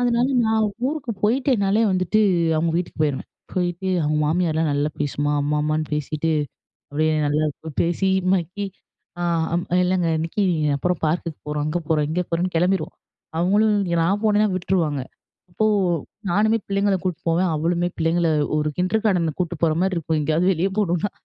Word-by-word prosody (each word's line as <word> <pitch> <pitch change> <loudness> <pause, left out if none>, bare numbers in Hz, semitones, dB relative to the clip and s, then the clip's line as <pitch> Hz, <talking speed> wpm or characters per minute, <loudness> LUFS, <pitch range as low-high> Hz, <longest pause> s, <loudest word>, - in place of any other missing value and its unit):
அதனால 245 0 +2 0.2
நான் 220 0 +2 0.2
ஊருக்கு 290 -4 -3
போயிட்டேன்னாலே 220 -3 +2
வந்துட்டு, 185 +3 +1 0.4
அவங்க 165 +1 +1
வீட்டுக்கு 175 -2 -4
போயிறுவேன். 145 -3 -1 0.2
போயிட்டு, 180 +1 -2
அவங்க 150 +1 0
மாமியார்லா 160 -1 +1
நல்லா 145 +1 0
பேசுமா 145 0 -1
அம்மா, 150 +1 0
அம்மான்னு 155 0 0
பேசிட்டு 155 +2 -1 0.6
அப்படியே 155 +2 +1
நல்லாப் 150 0 -2
பேசி 175 +3 0 0.2
மக்கி. 190 +2 -1 0.6
அ - - -1 0.3
அம் 175 +1 0 0.2
இல்லங்க 180 -2 +1
இன்னைக்கு 165 +6 -1 0.3
அப்புறம் 180 +4 -1
பார்க்குக்கு 165 0 -2
போறோம், 150 0 -2
அங்க 155 +3 -1
போறோம், 150 -2 +2
இங்க 175 +3 0
போறோம்ன்னு 175 +2 -1
கிளம்பிறுவோம். 180 +3 +1 0.4
அவங்களும் 205 +4 +3 0.3
நான் 195 +5 +1
போனேனா 210 0 +4
விட்டுருவாங்க. 170 -6 0 0.5
அப்போ, 195 +5 -1 0.7
நானுமே 215 +4 +3
பிள்ளைங்கள 200 0 +1
கூட்டு 180 -4 -2
போவேன், 170 +2 +2
அவளுமே 170 +3 0
பிள்ளைங்கள 165 +1 +2 0.3
ஒரு 150 0 +1
கிண்டர்கார்டன 185 -4 +1
கூட்டு 175 -1 -1
போற 160 - +4
மாரி 190 0 +1
இருக்கும் 160 -1 -1
எங்கேயாவது 160 +5 +2
வெளியே 185 +3 0
போணும்னா. 185 -1 +1
175 Hz, 145 wpm, -22 LUFS, 155-195 Hz, 0.7 s, போனேனா